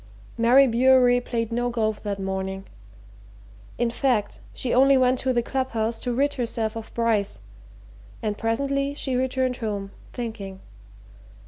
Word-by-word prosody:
Mary 245 +4 +6
Bewery 250 0 +4
played 230 -2 -3
no 245 +1 0
golf 220 -3 -1
that 200 -2 -3
morning. 190 0 -3 1.1
In 240 -1 0
fact, 235 -4 0
she 250 - -3
only 270 +2 +6
went 255 0 +3
on - - -2
to 260 - +3
the 240 -1 +1
club 260 +1 -2
house 225 0 -1
to 245 - -3
rid 280 +4 +1
herself 230 -3 -2
of 225 -1 -7
Bryce, 225 -4 0 0.8
and 215 -2 -2
presently 275 +6 -1
she 265 -3 -2
returned 255 0 0
home, 205 -3 -4 0.2
thinking. 220 -6 -6
235 Hz, 145 wpm, -24 LUFS, 220-260 Hz, 1.1 s, Mary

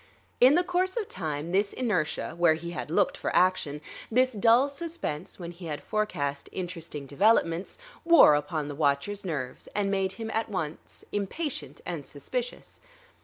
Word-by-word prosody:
In 260 +4 +7
the 355 - +4
course 365 +3 0
of 430 -3 -1
time 155 -1 -4
this 200 +2 +2
inertia, 205 -15 -1
where 170 -2 +4
he 170 +2 -6
had 175 - -5
looked 165 - +2
for - - -3
action, 175 -5 +2 0.3
this 255 +2 +3
dull 230 +5 +5
suspense 280 - -5
when 170 -2 -6
he 175 0 -9
had 150 -2 -4
forecast 145 -10 -2
interesting 165 -5 -6
developments, 170 +3 +2 0.3
wore 335 - +8
upon 150 +1 -1
the 145 - -5
watcher's 145 +7 0
nerves 140 -9 -4
and 200 -1 +1
made 195 -1 0
him 225 +2 -5
at 225 +1 -1
once 160 -6 -5
impatient 250 - -3
and - - -4
suspicious. - - -5
185 Hz, 160 wpm, -28 LUFS, 155-230 Hz, 0.3 s, wore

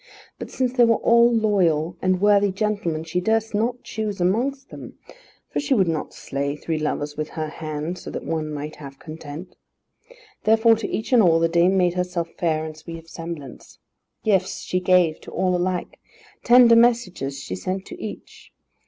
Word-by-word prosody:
But - - -7
since 255 -1 -1
they 250 -2 +4
all 235 0 +5
were - - -2
loyal 175 -7 +1
and 185 -1 +1
worthy 205 0 +4
gentlemen, 195 -6 -2
she 165 +2 -2
durst 220 +3 0
not 235 +4 -1
choose 215 -3 -4
amongst 245 +10 0
them; - - -10 0.5
for - - -1
she 280 -2 +1
would 190 -6 +3
not 160 -2 -2
slay 140 +1 -4
three 155 +1 -3
lovers 150 -1 -2
with 155 0 -4
her 155 -1 -4
hand 155 +2 -5
so - - -8
that - - -6
one 155 -2 -2
might 150 +1 -6
have 140 -2 -10
content. 155 +2 -9 0.9
Therefore 225 +1 +5
to 220 - -4
each 220 +4 -3
and 240 - +7
all, 165 -4 +4
the 165 - +3
dame 175 +3 +3
made 180 -2 +2
herself 180 -2 -2
fair 160 -2 0
and 155 -1 -7
sweet 165 +2 -9
of 165 0 -14
semblance. 165 -6 -9 0.5
Gifts 195 -3 +1
she 180 - -1
gave 180 -3 +3
to - - -11
all 185 0 0
alike. 180 0 -2 0.4
Tender 240 -1 +7
messages 230 - +2
she 115 - -6
sent 185 - -4
to - - -9
each. 215 - -9
180 Hz, 180 wpm, -23 LUFS, 155-215 Hz, 0.9 s, and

